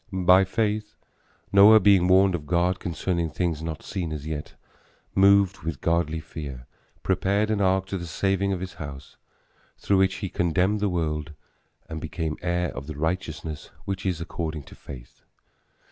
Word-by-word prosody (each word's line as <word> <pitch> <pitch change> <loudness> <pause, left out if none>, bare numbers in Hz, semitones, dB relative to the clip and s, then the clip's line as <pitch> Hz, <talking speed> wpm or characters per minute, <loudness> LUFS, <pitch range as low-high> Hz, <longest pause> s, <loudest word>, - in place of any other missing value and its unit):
By 95 0 +5
faith 105 +1 -1 0.6
Noah, 105 +2 +8
being 95 -3 +5
warned 95 +1 +5
of 75 -4 -4
God 90 +2 +1
concerning 85 0 -2
things 80 0 -2
not 80 -1 -5
seen 90 -5 -4
as 75 -1 -5
yet, 75 -1 -5 0.6
moved 100 0 +4
with 80 -4 -4
godly 85 0 0
fear, 70 -5 -8 0.4
prepared 100 +3 +1
an 105 -2 0
ark 95 0 +2
to 95 - -3
the 85 - -6
saving 95 +3 0
of 95 -2 -2
his 95 -1 -6
house, 70 -3 -9 0.6
through 100 - +1
which 95 0 +3
he 100 - -4
condemned 90 +5 +1
the 105 0 +1
world 75 -3 -2 0.5
and 80 -1 -6
became 80 -3 -3
heir 90 0 0
of 70 - -7
the 80 -2 -7
righteousness 80 -1 -3 0.2
which 95 -1 -3
is 90 -4 -1
according 80 -2 -4
to - - -15
faith. - - -12
90 Hz, 160 wpm, -25 LUFS, 80-95 Hz, 0.6 s, Noah